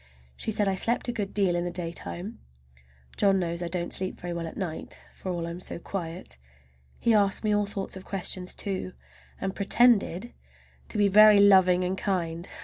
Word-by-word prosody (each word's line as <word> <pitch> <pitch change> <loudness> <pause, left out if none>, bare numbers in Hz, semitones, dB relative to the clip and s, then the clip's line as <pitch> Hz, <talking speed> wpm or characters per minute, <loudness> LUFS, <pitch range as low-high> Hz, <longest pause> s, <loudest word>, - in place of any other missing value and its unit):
She - - -6
said 210 -1 0
I 195 - +2
slept 230 +7 +1
a - - +1
good 205 -4 -4
deal 195 -4 +1
in 175 - 0
the 175 - -2
daytime. 175 +4 -5 0.8
John 195 -1 +3
knows 170 -1 -2
I 175 - -2
don't 175 0 -3
sleep 185 0 -2
very 175 0 -5
well 170 -1 -4
at - - -9
night, 175 -5 -5 0.2
for 185 - -6
all 170 -1 -3
I'm 170 +1 -6
so - - -4
quiet! 165 - -6 0.6
He 230 - +2
asked 200 -1 +2
me 210 -1 +2
all 205 0 +1
sorts 195 -2 -4
of 190 - -9
questions, 185 -2 -2
too, 185 -2 -4 0.5
and 190 0 -3
pretended 220 -1 +3 0.6
to - - -3
be 205 -1 +4
very 210 +1 +7
loving 190 -3 +5
and 180 +1 -1
kind. 175 -3 -2
190 Hz, 190 wpm, -27 LUFS, 175-205 Hz, 0.8 s, very